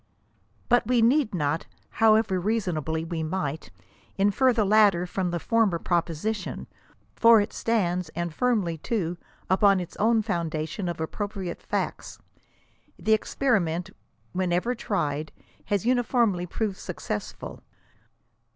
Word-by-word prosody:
But 245 - +3
we 245 -2 +3
need 240 -3 +3
not 150 0 -1
— - - -38
however 220 -4 +4
reasonably 170 -6 -1
we 165 -1 -3
might 155 -2 -3 0.3
— - - -32
infer 255 +6 +4
the 225 -3 +1
latter 200 -4 +4
from 180 0 -2
the 170 0 -2
former 225 -3 +2
proposition, 175 +4 -2 0.5
for 230 -1 +7
it 205 - -2
stands, 180 -7 0
and 170 -1 -3
firmly 200 -8 0
too, 180 -5 -2 0.3
upon 195 0 +4
its 180 -1 -7
own 220 +1 +3
foundation 170 +1 -2
of 170 - -5
appropriate 190 +2 -4
facts. - - -3 0.8
The 220 - +2
experiment 190 -7 0 0.4
whenever 180 +5 0
tried, 155 -10 -2 0.3
has 205 +1 -1
uniformly 235 -7 +2
proved 200 +1 -2
successful. 105 - -6
190 Hz, 125 wpm, -26 LUFS, 170-220 Hz, 0.8 s, for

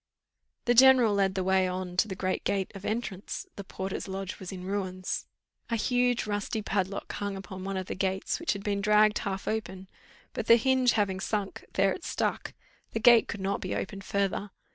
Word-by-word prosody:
The 240 - +4
general 255 -3 +7
led 195 -1 +2
the 190 - 0
way 190 0 +3
on 180 -1 -4
to 215 - +3
the 190 - -5
great 185 0 -2
gate 195 -2 -1
of 195 -1 -9
entrance: 215 -4 -3
the 200 - -6
porter's 190 +1 -5
lodge 190 0 -5
was 190 0 -7
in 185 -2 -7
ruins. 185 -1 -3 0.4
A 230 - +1
huge 245 +1 +1
rusty 205 +1 -2
padlock 195 0 -2
hung 205 -1 -3
upon 190 -1 -8
one 195 0 -3
of 185 - -3
the - - -4
gates, 190 0 -1
which 340 - 0
had 200 -1 -7
been 200 -1 -1
dragged 210 +1 +4
half 195 -1 -4
open, 190 -4 -3 0.5
but, 225 - -4
the 230 - +9
hinge 255 +1 +3
having 195 -3 0
sunk, 205 0 -3
there 195 0 +3
it 360 - -9
stuck - - -2 0.4
the 225 - -1
gate 235 0 +7
could 205 - -5
not 195 +1 -1
be - - -3
opened 195 0 -4
further. 200 +1 -1
200 Hz, 200 wpm, -29 LUFS, 190-215 Hz, 0.5 s, the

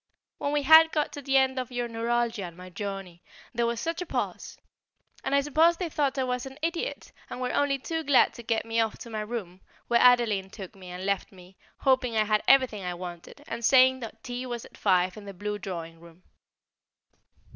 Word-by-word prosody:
When 285 - -1
we 295 -1 +1
had 320 +3 +8
got 300 -1 0
to 285 - -6
the 270 0 +2
end 265 0 +2
of 255 -1 -5
your 245 -1 -2
neuralgia 230 -2 -1
and 170 -1 -10
my 180 0 -11
journey, 195 -2 -6 0.3
there 235 -1 +1
was 235 -1 -2
such 330 +5 -3
a - - -3
pause! - - -4 0.7
and 270 - 0
I 280 - +4
suppose 315 +4 +3
they 355 -2 -3
thought 285 -3 0
I 265 - +1
was 250 0 -2
an 265 +1 -11
idiot, 335 +9 -3 0.2
and - - -6
were 250 0 -2
only 285 -1 +2
too 320 +4 -4
glad 280 -3 +4
to - - -9
get 230 -1 -1
me 225 0 -1
off 225 -1 0
to 235 - -10
my 215 -1 -3
room, 210 -5 -6 0.3
where 235 0 +4
Adeline 230 -6 +4
took 190 -2 -9
me, 185 -2 -12
and 180 +1 -6
left 200 -1 -1
me, 185 -1 -16 0.3
hoping 255 -4 +2
I 215 - +4
had 215 0 +1
everything 260 -7 +4
I 180 -1 -3
wanted, 175 +9 -9
and 235 - -5
saying 260 +1 +5 0.2
tea 250 0 -5
was 240 -1 -5
at - - -16
five 185 -1 +2
in 210 - -10
the 200 -1 -9
blue 210 +2 -4
drawing 165 -4 -6
room. 170 +1 -17
235 Hz, 215 wpm, -27 LUFS, 195-265 Hz, 0.7 s, had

